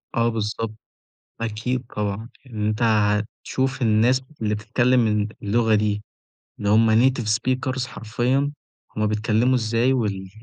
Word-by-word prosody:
آه 115 0 +3
بالضبط، 110 0 -3 0.7
أكيد 115 +3 -2
طبعًا 105 +2 -3 0.2
إن 105 -2 -2
أنت 110 0 -1
هتشوف 110 +4 0
الناس 120 +3 +3 0.2
اللي 105 -1 0
بتتكلم 120 +3 +2
ال 105 -1 +1 0.2
اللغة 110 +2 +2
دي 105 -1 0 0.6
اللي 100 - -2
هُم 110 +1 +5 0.2
native 130 -2 -3
speakers 130 +1 -1
حرفيًا 125 +6 -1 0.4
هُم 110 0 +1
بيتكلموا 110 +4 +1
إزاي 115 +2 +2
وال 100 -6 -1
110 Hz, 125 wpm, -23 LUFS, 105-125 Hz, 0.7 s, هُم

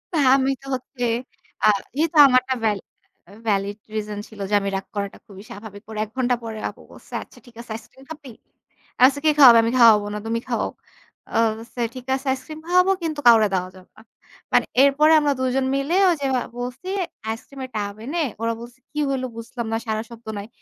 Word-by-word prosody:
তা - - +2 0.2
আমি 270 0 +2
তো 275 - -16
হচ্ছে 255 0 -7 0.6
আ - - +6 0.3
যেহেতু 320 +1 0
আমার 255 -1 +5
একটা 260 0 -2
ভ্যালিড 210 -3 0 0.6
ভ্যালিড 200 0 0 0.2
রিজন 210 -1 -3
ছিল 215 -2 -15
যে 210 - -4
আমি 200 - -2
রাগ 195 - -4
করাটা 200 -1 -3
খুবই 200 -3 -12
স্বাভাবিক। 205 -1 -10
পরে 220 -1 -6
১ 215 - -18
ঘণ্টা 250 -1 +2
পরে 220 -1 -6
আপু - - -14
বলছে, - - -16
"আচ্ছা - - -19
ঠিক 240 - -18
আছে 235 -2 -12
আইসক্রিম 225 +4 -13
খাবি?" 290 -5 -9 0.7
আমি 250 - +7
বলছি, 285 +1 -1
"কে 310 - +6
খাওয়াবে? 240 -5 +10
আমি 230 - 0
খাওয়াবো 220 -3 +7
না, 210 - -3
তুমি 230 +1 0
খাওয়াও।" - - -1 0.6
আ - - +3 0.2
বলছে, 235 +2 -11 0.2
"ঠিক 255 - -8
আছে 270 - -7
আইসক্রিম 270 +4 -5
খাওয়াবো 365 +2 +4
কিন্তু 310 -2 -2
কাউরে 225 -2 +7
দেওয়া 185 -1 -1
যাবে 185 -1 -16
না।" - - -14 0.5
মানে - - +4 0.2
এরপরে 290 +3 +5
আমরা 295 -1 +1
দুজন 260 +1 0
মিলে 275 +6 0 0.2
ওইযে 290 -5 -2 0.3
বলছি 250 +7 -6 0.4
আইসক্রিমের 260 +4 -6
টাব 205 -1 -2
এনে। 330 +6 -2 0.2
ওরা 230 0 0
বলছে, 240 +1 -11
"কি 300 - -4
হইল 265 -1 -1
বুঝলাম 235 +1 -6
না, - - +2
সাড়া 220 0 -2
শব্দ 235 0 -13
নাই।" 200 - -6
240 Hz, 200 wpm, -22 LUFS, 215-275 Hz, 0.7 s, খাওয়াবে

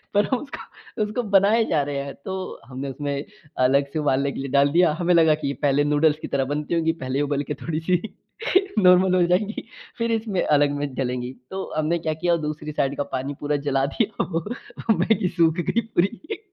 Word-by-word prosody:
पर 205 0 +4
हम 260 - +3
उसको, 285 +3 -8 0.4
उसको 215 +4 -2
बनाए 205 +4 +5
जा 155 - +2
रहे 140 - -2
हैं 140 0 -7
तो 190 - -3 0.3
हमने 135 +3 -6
उसमें 140 +1 -3 0.3
अलग 135 +2 +3
से 160 - -1
उबालने 140 -1 +1
के - - -7
लिए 135 0 -4
डाल 140 0 +4
दिया। 170 +1 +4
हमें 180 0 +2
लगा 160 -2 +5
कि 150 - -4
ये 140 - -1
पहले 145 0 +3
नूडल्स 150 +1 +3
की - - -4
तरह 135 -1 0
बनती 150 +2 -2
होगी 165 -1 +2
पहले 130 +2 -1
उबाल 145 0 0
के - - +2
थोड़ी-सी 165 +2 0 0.8
नॉर्मल 185 -1 +5
हो 180 - +4
जाएगी 205 +6 0 0.3
फ़िर 230 0 0
इसमें 220 -4 0
अलग 145 -1 +3
में 140 -2 -4
डलेंगी। 125 -1 -2 0.2
तो 190 0 -3
हमने 155 +2 +1
क्या 155 - +2
किया 175 -1 +4
दूसरी 150 0 -5
साइड 140 -1 -1
का 145 - 0
पानी 135 +2 -3
पूरा 150 0 0
जला 135 0 +2
दिया 215 -2 0
वो 165 -1 -2 0.5
मैगी 195 -4 +2
सूख 165 -1 +4 0.2
गयी 230 - +2
पूरी। 235 - -1
155 Hz, 205 wpm, -23 LUFS, 140-185 Hz, 0.8 s, बनाए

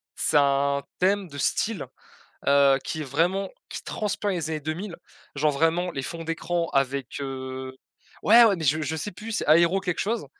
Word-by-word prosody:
c'est - - +2
un 140 0 +2 0.2
thème 195 0 +1
de 140 - -10
style, 215 +9 -1 0.6
heu, 140 -1 +5
qui 155 - -4
est - - -2
vraiment, 170 +8 0 0.2
qui - - -6
transpire 205 -1 -2
les 165 -4 -2
années 155 -1 -2
2000, 165 +5 -5 0.4
genre 150 +1 +2
vraiment 165 +5 +1
les 135 - -4
fonds 165 +5 -6
d'écran 170 +1 -1
avec, 135 0 -1
heu, 130 -1 -5 0.5
ouais, 235 +3 +8
ouais, 215 -4 +5
mais 165 - -5
je 155 +3 +2
je 155 +2 -2
sais 160 +7 -4
plus! 220 +5 -8
C'est - - -1
Aero 170 +5 +5
quelque 180 -3 -3
chose 225 +3 -1
160 Hz, 185 wpm, -25 LUFS, 140-190 Hz, 0.6 s, ouais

